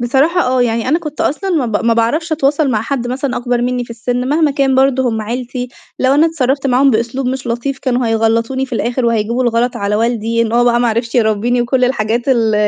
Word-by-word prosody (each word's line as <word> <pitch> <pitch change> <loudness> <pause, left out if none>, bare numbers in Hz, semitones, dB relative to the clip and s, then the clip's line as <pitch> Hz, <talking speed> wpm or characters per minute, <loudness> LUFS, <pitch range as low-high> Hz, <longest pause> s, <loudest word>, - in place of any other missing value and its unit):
بصراحة 275 +9 +2
آه. 255 -4 +1
يعني 230 0 -1
أنا 315 +5 +2
كنت 305 -3 -7
أصلًا 385 +7 -1
ما 310 -8 +1
ب 220 -1 -2
ما 230 0 +3
باعرفش 300 +9 0
أتواصل 290 -1 +1
مع 215 -3 0
حد 245 0 -3
مثلًا 260 +1 -2
أكبر 245 0 -1
منّي 245 0 -1
في 235 - -17
السِن 245 +2 -3
مهما 305 +1 +2
كان 275 -1 +1
برضه 265 -1 +2
هم 220 -2 -2
عيلتي، 245 +2 -4 0.3
لو 260 +1 +2
أنا 305 +3 +4
اتصرّفت 275 -4 -1
معاهم 270 +2 +3
بأسلوب 235 +3 -1
مش 260 0 -3
لطيف 240 +4 -3
كانوا 250 -2 -1
هيغلّطوني 230 +4 0
في 265 - -20
الآخر 245 +2 -1
وهيجيبوا 230 +1 0
الغلط 240 +1 0
على 200 +1 -1
والدي 230 0 0
إن 225 -1 -2
هو 240 +1 +3
بقى 240 0 +2
ما 240 - +2
عرفش 230 +1 -2
يربّيني 235 +1 +1
وكل 255 +1 +1
الحاجات 235 -2 0
ال 230 -4 +2
245 Hz, 220 wpm, -15 LUFS, 230-270 Hz, 0.3 s, أنا